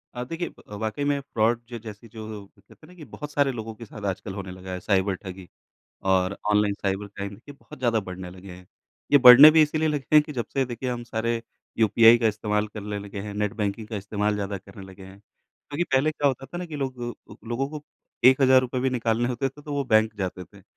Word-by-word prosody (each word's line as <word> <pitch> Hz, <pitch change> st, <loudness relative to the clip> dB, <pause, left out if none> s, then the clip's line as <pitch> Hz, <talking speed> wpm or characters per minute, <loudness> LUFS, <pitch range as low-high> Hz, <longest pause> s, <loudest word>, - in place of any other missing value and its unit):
अ, 125 Hz, -, -4 dB
देखिए 165 Hz, +7 st, -4 dB, 0.2 s
अ, 105 Hz, -, -7 dB
वाक़ई 110 Hz, +6 st, -3 dB
में 145 Hz, 0 st, +1 dB
फ्रॉड 115 Hz, -3 st, 0 dB
ज 120 Hz, -, -4 dB
जैसी 110 Hz, 0 st, -10 dB
जो, 110 Hz, -2 st, -8 dB
कहते -, -, -20 dB
हैं -, -, -19 dB
ना 180 Hz, -, -16 dB
कि 160 Hz, -4 st, -11 dB
बहुत 150 Hz, 0 st, -7 dB
सारे 145 Hz, -2 st, +2 dB
लोगों 115 Hz, -2 st, -6 dB
के 115 Hz, -, -10 dB
साथ 105 Hz, -1 st, -11 dB
आजकल 95 Hz, +1 st, -5 dB
होने 95 Hz, -2 st, -6 dB
लगा 95 Hz, 0 st, -9 dB
है, 90 Hz, -, -4 dB
साइबर 95 Hz, 0 st, +1 dB
ठगी 95 Hz, 0 st, -10 dB, 0.6 s
और 95 Hz, +1 st, +2 dB
ऑनलाइन 105 Hz, -1 st, +2 dB
साइबर 100 Hz, +1 st, -1 dB
क्राइम 100 Hz, 0 st, -7 dB
ये -, -, -7 dB
बहुत 140 Hz, -, -15 dB
ज़्यादा 120 Hz, -3 st, +1 dB
बढ़ने 90 Hz, -1 st, -7 dB
लगे 95 Hz, +1 st, -12 dB
हैं। 90 Hz, 0 st, -12 dB, 0.5 s
ये 145 Hz, -, +8 dB
बढ़ने 130 Hz, +4 st, +11 dB
भी 160 Hz, 0 st, +6 dB
इसलिए 155 Hz, +1 st, +1 dB
लगे 145 Hz, -2 st, -2 dB
हैं 150 Hz, -, +8 dB
कि 150 Hz, -, -9 dB
जब 120 Hz, -4 st, -2 dB
से 135 Hz, -1 st, +2 dB
देखिए 125 Hz, +1 st, -5 dB
हम 120 Hz, -1 st, -4 dB
सारे 115 Hz, 0 st, -2 dB, 0.4 s
यूपीआई 115 Hz, +2 st, +6 dB
का 115 Hz, -, +1 dB
इस्तेमाल 105 Hz, 0 st, -1 dB
करले 105 Hz, 0 st, -6 dB
लगे 100 Hz, 0 st, -8 dB
हैं, 105 Hz, 0 st, -7 dB
नेट 105 Hz, 0 st, -1 dB
बैंकिंग 105 Hz, 0 st, -3 dB
का 110 Hz, -, -4 dB
इस्तेमाल 105 Hz, +1 st, -1 dB
ज़्यादा 100 Hz, -1 st, -3 dB
करने 95 Hz, +1 st, -13 dB
लगे 95 Hz, 0 st, -13 dB
हैं। 95 Hz, +1 st, -13 dB
क्योंकि 145 Hz, +9 st, -7 dB
पहले 135 Hz, +4 st, +3 dB
क्या 145 Hz, -1 st, -1 dB
होता 135 Hz, 0 st, -4 dB
था 175 Hz, +7 st, -7 dB
ना 180 Hz, -, -5 dB
कि 160 Hz, -3 st, -7 dB
लोग 130 Hz, -3 st, -4 dB, 0.3 s
अ, -, -, -10 dB
लोगों 125 Hz, +4 st, -1 dB
को 150 Hz, 0 st, -8 dB, 0.4 s
1,000 130 Hz, -1 st, +5 dB
भी 130 Hz, +1 st, +1 dB
निकालने 120 Hz, -1 st, 0 dB
होते 125 Hz, +2 st, -1 dB
थे 145 Hz, +3 st, -15 dB
तो 145 Hz, -, -7 dB
वो 140 Hz, -1 st, -1 dB
बैंक 110 Hz, -2 st, +3 dB
जाते 95 Hz, -1 st, -4 dB
थे, 100 Hz, +2 st, -19 dB
110 Hz, 235 wpm, -25 LUFS, 100-130 Hz, 0.6 s, बढ़ने